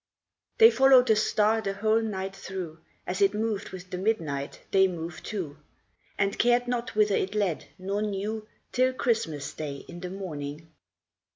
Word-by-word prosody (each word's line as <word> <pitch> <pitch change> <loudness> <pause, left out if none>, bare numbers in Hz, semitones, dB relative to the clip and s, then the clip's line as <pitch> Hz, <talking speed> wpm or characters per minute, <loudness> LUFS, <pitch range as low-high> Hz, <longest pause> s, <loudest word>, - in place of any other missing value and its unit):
HEY 455 -1 +9
followed 265 -1 +6
the 220 - +6
Star 215 +1 +2
the 195 -2 -2
whole 215 +2 +2
night 195 -3 -3
through; 185 -5 -6 0.3
As 185 +3 -3
it 200 +1 +4
moved 215 -1 -1
with 185 0 -10
the 180 - -3
midnight 160 -10 -2
they 190 0 +5
moved 170 -2 -6
too; 175 -9 -4 0.6
And 200 0 0
cared 245 +1 +3
not 245 -2 -2
whither 210 -1 +4
it 195 +3 -1
led, 195 -6 0
nor 195 +2 -2
knew, 215 +1 -3 0.2
Till 255 +1 +2
Christmas 190 - -1
Day 145 -3 -6
in 175 - -9
the 180 0 -5
morning. 160 -4 -6
195 Hz, 165 wpm, -27 LUFS, 175-220 Hz, 0.6 s, HEY